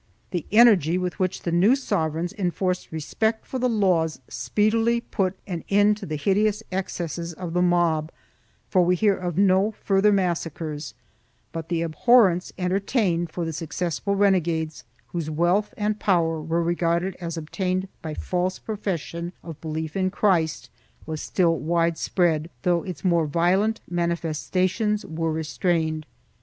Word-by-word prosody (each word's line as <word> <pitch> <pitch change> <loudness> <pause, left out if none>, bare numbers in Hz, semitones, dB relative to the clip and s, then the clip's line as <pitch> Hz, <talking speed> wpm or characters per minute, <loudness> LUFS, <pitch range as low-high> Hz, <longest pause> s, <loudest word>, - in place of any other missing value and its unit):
The 175 -4 -3
energy 205 -7 +6
with 180 -1 -3
which 185 -1 -1
the 170 - -1
new 190 +9 +5
sovereigns 165 - -1
enforced 185 -1 -2
respect 220 +8 -1
for 260 - -4
the 250 0 +2
laws 180 -8 +1
speedily 225 +3 +1
put 190 -5 -2
an 175 -4 -5
end 205 +1 +4
to - - -8
the 155 - -3
hideous 200 +7 +1
excesses 170 -3 -3
of 170 0 -6
the 180 - +2
mob, 170 -3 +2 0.6
for 185 -2 +3
we 180 +1 +3
hear 200 +2 +3
of 175 -3 -4
no 195 +1 +4
further 200 +1 +4
massacres, 165 -5 -2 0.6
but 165 -1 -6
the 170 -1 0
abhorrence 180 +2 +4
entertained 180 -1 0
for 170 +1 -3
the 160 - -3
successful 170 +4 -2
renegades, 170 -5 +1 0.2
whose 165 -3 -3
wealth 175 +7 +1
and 210 0 -1
power 165 -5 +1
were 165 +2 0
regarded 170 +2 0
as 170 -1 -4
obtained 185 +4 -2
by 155 -4 -5
false 180 +3 -1
profession 175 -5 -4
of 165 -4 -9
belief 160 -1 -4
in 185 -1 +1
Christ, 180 -5 +1 0.3
was 155 -1 -4
still 170 -3 +1
wide 170 +1 +1
spread, 165 -3 +1
though 175 -1 +2
its 180 -2 -7
more 170 -3 +3
violent 185 +8 +1
manifestations 175 +5 -1
were 160 0 -2
restrained. 160 0 -1
175 Hz, 145 wpm, -24 LUFS, 165-195 Hz, 0.6 s, energy